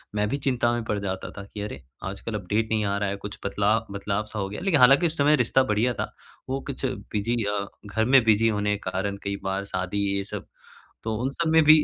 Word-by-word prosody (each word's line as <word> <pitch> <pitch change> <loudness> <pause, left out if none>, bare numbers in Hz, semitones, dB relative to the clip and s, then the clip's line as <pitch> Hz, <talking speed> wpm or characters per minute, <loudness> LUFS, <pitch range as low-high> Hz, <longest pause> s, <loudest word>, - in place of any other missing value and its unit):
मैं 105 0 +2
भी 140 - 0
चिंता 125 -3 +1
में 120 -1 -1
पड़ 105 - -1
जाता 95 -2 -4
था 100 - -5
कि 105 - -5
अरे! 100 -10 -5 0.3
आजकल 100 +3 -6
अपडेट 105 +3 -1
नहीं 110 -1 +2
आ 100 0 0
रहा 100 -1 0
है। 100 - -2
कुछ 100 +1 -7
बदला 105 +2 +2
बदलाव-सा 105 +2 -3
हो 95 -1 -2
गया, 105 - -5
लेकिन 180 -5 +3
हालाँकि 135 +7 +7
उस 165 0 -5
समय 145 +1 +5
रिश्ता 130 0 +3
बढ़िया 120 +1 +1
था। - - -4 0.4
वो 135 +1 0
कुछ 140 -1 -3
बिज़ी 120 -3 -2
अ, 100 0 -1 0.2
घर 110 +2 0
में 130 +1 +6
बिज़ी 110 0 +4
होने 105 -1 +1
के 95 - -5
कारण 100 +2 -2
कई 100 0 -1
बार 95 +1 -1
शादी 95 0 -3 0.2
ये 100 - 0
सब 95 - -7 0.6
तो 110 0 -1
उन 130 - +1
सब 165 +4 -1
में 160 0 +6
भी 155 0 +8
105 Hz, 240 wpm, -26 LUFS, 100-125 Hz, 0.6 s, भी